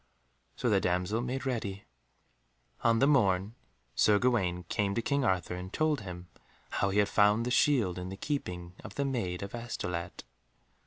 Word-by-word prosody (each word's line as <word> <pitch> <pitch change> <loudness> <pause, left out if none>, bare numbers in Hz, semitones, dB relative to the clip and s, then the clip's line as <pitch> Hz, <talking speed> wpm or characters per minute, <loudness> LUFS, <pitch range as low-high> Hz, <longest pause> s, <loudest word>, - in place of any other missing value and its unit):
So - - -2
the - - +3
damsel 90 +5 0
made 130 +2 -3
ready. 105 -6 -3 1.0
On 115 -1 +4
the 135 - +4
morn 100 -8 +3 0.4
Sir 105 -1 +4
Gawaine 95 -7 +1
came 100 +3 -1
to 115 - +1
King 140 +1 +1
Arthur 95 -6 0
and 90 +1 -6
told 155 -5 +1
him 90 -2 -8 0.4
how 100 - +1
he 100 - -1
had 105 -1 +4
found 105 +3 +3
the 125 - -1
shield 120 -9 +3
in 90 +1 -5
the 95 - -7
keeping 90 - -4
of 105 -1 -9
the 140 - 0
Maid 100 -10 -2
of 100 - -7
Astolat. 90 -7 -4
105 Hz, 170 wpm, -30 LUFS, 90-120 Hz, 1.0 s, On